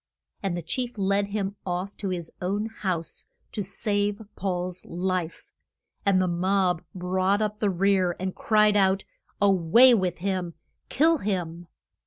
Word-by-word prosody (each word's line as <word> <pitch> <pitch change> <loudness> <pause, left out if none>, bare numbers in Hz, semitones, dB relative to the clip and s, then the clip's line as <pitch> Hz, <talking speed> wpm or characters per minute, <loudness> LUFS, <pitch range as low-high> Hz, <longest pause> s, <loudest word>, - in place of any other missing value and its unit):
And 190 -3 -1
the 175 - -5
chief 245 +8 -3
led 200 +1 +1
him 200 -1 -3
off 185 +2 -3
to 195 - -3
his 175 -3 -4
own 200 +4 -1
house, 185 -7 -3 0.2
to 210 - -3
save 205 +1 -1 0.2
Paul's 180 -1 -3
life, 180 -1 -2 0.6
and 195 -2 +5
the 185 - +2
mob 180 0 +1
brought 185 +2 +1
up 210 -1 -2
the 210 - +2
rear, 185 -1 +2
and 185 0 -2
cried 210 -1 +3
out, 195 -1 +3 0.3
A 200 -1 +5
way 195 +8 +6
with 185 -5 +1
him! 185 -2 -2 0.3
Kill 320 +2 +4
him! 175 -5 -3
190 Hz, 150 wpm, -26 LUFS, 180-205 Hz, 0.6 s, way